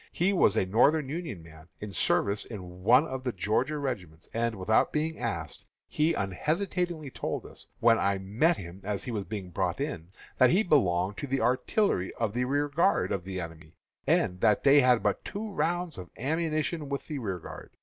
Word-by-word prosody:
He 185 +4 +2
was 110 - +4
a 95 - +2
Northern 135 +9 +3
Union 150 - -5
man, 80 0 -15
in 105 -1 -6
service 100 +2 +1
in 90 -4 -9
one 125 +9 +5
of 130 -4 -5
the 125 - -1
Georgia 110 - 0
regiments; 95 - -5
and, 115 0 0
without 100 +3 +2
being 160 +1 -1
asked, 85 -11 -4 0.2
he 155 +2 +1
unhesitatingly 160 - -2
told - - -3
me, - - -10 0.3
when 115 -1 +5
I 100 0 +1
met 110 - +1
him 90 +1 -9
as 100 0 -3
he 125 - -4
was 105 -4 -3
being 100 -4 -6
brought 90 +3 -1
in, 90 - -4 0.3
that 130 - +7
he 195 +6 +3
belonged 95 - +2
to 145 - -4
the 135 0 0
artillery 125 - +1
of 110 -3 -1
the 125 +1 0
rearguard 145 +7 +1
of 90 -3 -2
the 95 -1 -4
enemy, 80 -2 -9 0.3
and 90 0 +2
that 105 - +3
they 145 +1 +7
had 125 -3 +4
but 100 -3 0
two 215 +1 -5
rounds 175 - -1
of 90 -2 -9
ammunition 155 +2 -1
with 140 0 -3
the 150 -2 -4
rearguard. 95 -8 -6
115 Hz, 190 wpm, -29 LUFS, 95-150 Hz, 0.3 s, that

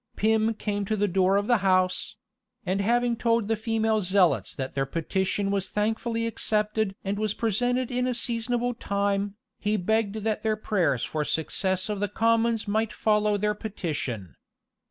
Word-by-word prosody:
Pym 220 +1 +2
came 205 -1 -2
to 215 - 0
the 205 0 +1
door 190 +1 +3
of 205 - 0
the 240 +1 +4
house; 185 +1 +1 0.5
and 190 +2 0
having 240 +3 +2
told 230 -2 +1
the 225 - +1
female 220 0 0
zealots 185 -2 +2
that 130 -2 -4
their 135 -1 -1
petition 190 +6 -1
was 195 -1 -1
thankfully 225 +2 -1
accepted 215 -2 0
and 200 +1 -2
was 215 -1 -1
presented 245 +3 0
in 250 0 0
a 250 - 0
seasonable 240 +1 -1
time, 200 -2 -1 0.2
he 210 +1 0
begged 215 +2 0
that 220 -1 -1
their 215 -1 0
prayers 180 - 0
for 150 +5 -2
the - - -6
success 185 +5 0
of 210 -2 -3
the 205 0 -1
commons 230 +1 +1
might 220 +2 0
follow 210 -1 +2
their 210 +1 +1
petition. 150 - -4
210 Hz, 170 wpm, -26 LUFS, 195-225 Hz, 0.5 s, the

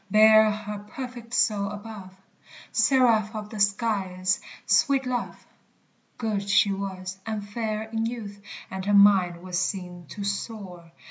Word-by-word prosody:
Bear 215 +1 +7
her 210 0 -4
perfect 240 +2 -8
soul 205 -4 +2
above. 205 -2 -8 0.6
Seraph 230 -5 +3
of 210 -1 -6
the 215 - -6
skies, 195 -3 +1 0.2
sweet 275 -3 +3
love! 250 -1 -4 0.7
Good 210 -4 -2
she 200 0 +4
was, 190 -1 -5
and 215 -2 -4
fair 215 0 -3
in 225 0 -2
youth; 210 -4 -7 0.3
And 190 0 -4
her 205 0 +3
mind 190 -4 +5
was 180 -1 -2
seen 180 -3 -4
to 205 - -7
soar. 200 -4 -5
205 Hz, 135 wpm, -26 LUFS, 190-220 Hz, 0.7 s, Bear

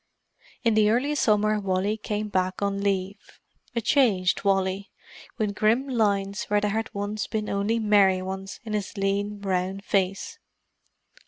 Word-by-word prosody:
In 230 -2 +3
the 215 -1 +4
early 255 +7 +1
summer 215 -6 +2
Wally 195 +1 0
came 210 0 -3
back 185 -1 -1
on 200 0 -1
leave: 195 0 -3 0.4
a 235 - +1
changed 205 -9 +2
Wally, 195 0 0 0.5
with 215 -3 -1
grim 225 +7 +2
lines 200 -5 0
where 205 0 +2
there 205 0 0
had 220 +1 -2
once 205 +1 -3
been 215 -1 -3
only 200 +3 0
merry 200 -4 +3
ones 190 +1 -6
in 215 - -5
his 205 0 -3
lean, 200 +1 -1
brown 190 -1 -2
face. 195 -1 -1
205 Hz, 150 wpm, -25 LUFS, 195-215 Hz, 0.5 s, the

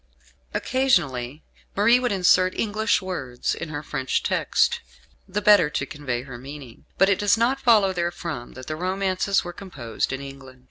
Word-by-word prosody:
Occasionally, 155 - 0 0.3
Marie 230 +5 +5
would 250 -1 -1
insert 185 -1 +3
English 220 -1 +1
words 130 -10 -3
in 165 - -6
her 145 -1 -5
French 130 -3 -2
text, - - +1 0.5
the 200 +2 -3
better 200 -6 +6
to 140 - -2
convey 130 -4 -4
her 130 -3 -9
meaning; 135 -2 -11
but 195 - +5
it 195 -1 +2
does 205 +2 +3
not 255 +4 +1
follow 215 -7 +4
therefrom 170 -7 -4
that 130 0 -10
the 155 - -4
romances 190 +2 0
were 175 - -7
composed 130 - -4
in 130 - -3
England. 135 -2 -11
175 Hz, 165 wpm, -24 LUFS, 135-200 Hz, 0.5 s, better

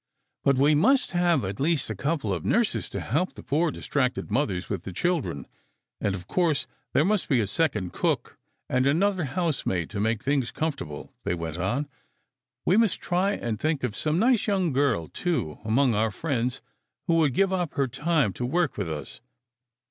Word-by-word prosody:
" - - -54
But 140 -1 +3
we 145 +3 +5
must 260 - +3
have 175 - +2
at 95 +1 -5
least 150 -4 +1
a - - -3
couple 135 - -1
of 85 -4 -3
nurses - - +1
to - - -4
help 160 +10 -1
the - - -10
poor, 160 +4 +1
distracted 130 -7 -1
mothers 100 -7 0
with 100 -5 -3
the 95 - -7
children, 90 - -1 0.5
and, 100 - 0
of 90 -2 -8
course, 160 -8 +1 0.3
there 150 - +4
must 210 0 +1
be 130 -5 +4
a 110 - +2
second 105 - 0
cook - - -1 0.3
and 130 +1 +2
another 180 +4 +2
housemaid 135 - -1
to 100 - -3
make 110 +1 0
things 135 -3 +1
comfortable," 140 - -4
they - - 0
went 85 -1 -5
on. 120 +11 -1 0.8
"We 185 - +4
must 225 -5 +3
try 185 +3 +1
and 115 - -3
think 155 -1 0
of 115 -4 -2
some 155 +1 0
nice 230 +2 +3
young 190 -7 +1
girl, 125 - +1
too, 120 - -2
among 120 +3 +3
our 110 +1 +2
friends, 125 - -2 0.4
who 165 -2 +3
would 150 -6 +3
give 195 -1 +3
up 180 -4 -1
her 140 -1 +2
time 145 - +1
to 125 - -5
work 160 +5 0
with 95 -5 -2
us. 80 +8 -6
140 Hz, 190 wpm, -26 LUFS, 105-170 Hz, 0.8 s, we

